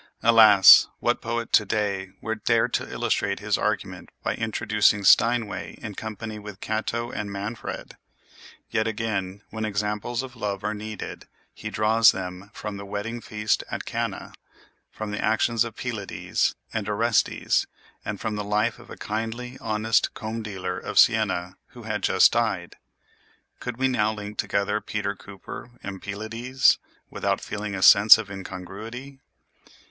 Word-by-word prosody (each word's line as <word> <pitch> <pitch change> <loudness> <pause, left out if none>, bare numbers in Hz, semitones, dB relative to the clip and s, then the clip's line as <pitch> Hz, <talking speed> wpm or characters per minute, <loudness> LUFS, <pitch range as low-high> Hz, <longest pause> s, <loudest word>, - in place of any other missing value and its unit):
Alas! 110 -4 +8
what - - 0
poet 115 0 -3
to - - +6
day 100 -2 -1
would 110 -1 -4
dare 115 0 +3
to - - -3
illustrate - - -1
his - - 0
argument - - -2
by - - 0
introducing 105 -2 +1
Steinway 115 +1 +3
in 105 -2 -6
company 110 +1 -6
with 105 -1 -10
Cato 115 +3 -2
and 105 -1 -4
Manfred! 100 +3 -6 0.7
Yet 110 - +1
again, 105 -3 -3
when 110 0 -4
examples 105 +3 -2
of 130 -2 -9
love 105 -3 -3
are 105 - -1
needed, 110 0 -7 0.3
he - - -6
draws 110 +1 +4
them 90 +1 -6
from 105 -1 -6
the 100 - -8
wedding 110 +4 -4
feast 105 -1 -1
at - - -5
Cana, - - -4 0.6
from 110 -1 -6
the 105 - -3
actions 110 +1 +2
of 115 -2 -7
Pylades 110 -6 -2 0.2
and 105 -2 -2
Orestes, 110 +1 +1 0.4
and 100 -2 -4
from 110 -1 -3
the 105 - -3
life 105 +2 0
of - - -15
a - - -9
kindly, 115 +4 -4
honest 110 0 +1
comb 110 0 -4
dealer 95 -4 -4
of - - -6
Siena 90 +2 +3 0.2
who 120 - -10
had 105 -1 -3
just 95 - +5
died. 110 -7 -1 0.8
Could 125 -2 -5
we 130 +1 +2
now 110 -4 +1
link 105 -1 -8
together 100 +1 0
Peter 105 -1 -3
Cooper 100 +4 -10
and 95 -1 -6
Pylades, 115 +6 +1 0.3
without - - -1
feeling 105 -1 -5
a 95 - -2
sense 105 +2 +9
of 110 -3 -6
incongruity? 105 +8 -8
105 Hz, 150 wpm, -25 LUFS, 100-115 Hz, 0.8 s, sense